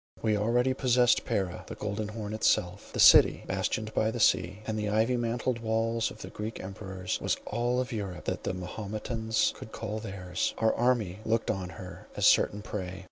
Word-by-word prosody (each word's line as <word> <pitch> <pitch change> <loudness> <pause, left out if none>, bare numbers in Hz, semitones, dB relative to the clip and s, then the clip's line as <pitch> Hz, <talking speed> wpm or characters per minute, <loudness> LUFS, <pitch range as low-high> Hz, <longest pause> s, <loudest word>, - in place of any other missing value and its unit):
We 110 -2 +2
already 120 +5 +2
possessed 125 -2 +3
Pera; 95 -3 -2
the - - -7
Golden 105 0 -3
Horn 105 -1 -5
itself, 100 -3 +1
the - - -5
city, - - +7
bastioned 110 0 -2
by 110 - +2
the 120 +1 -4
sea, 95 0 +2
and 110 - -2
the 105 -1 -1
ivy 110 +4 +2
mantled 120 +1 -1
walls 115 0 0
of - - -10
the - - -8
Greek 110 +1 -5
emperors 95 -1 -5
was - - 0
all 120 +3 0
of 130 +1 -2
Europe 100 -6 -5
that - - -2
the - - -2
Mahometans 110 +4 -2
could 110 - -10
call 110 -1 -4
theirs. 95 -4 -3
Our 110 -1 +2
army 115 -6 +1
looked 115 +1 +1
on 95 -3 -4
her 90 -1 -10
as - - +1
certain 105 +1 +4
prey. 95 -3 -5
110 Hz, 190 wpm, -29 LUFS, 95-115 Hz, -, city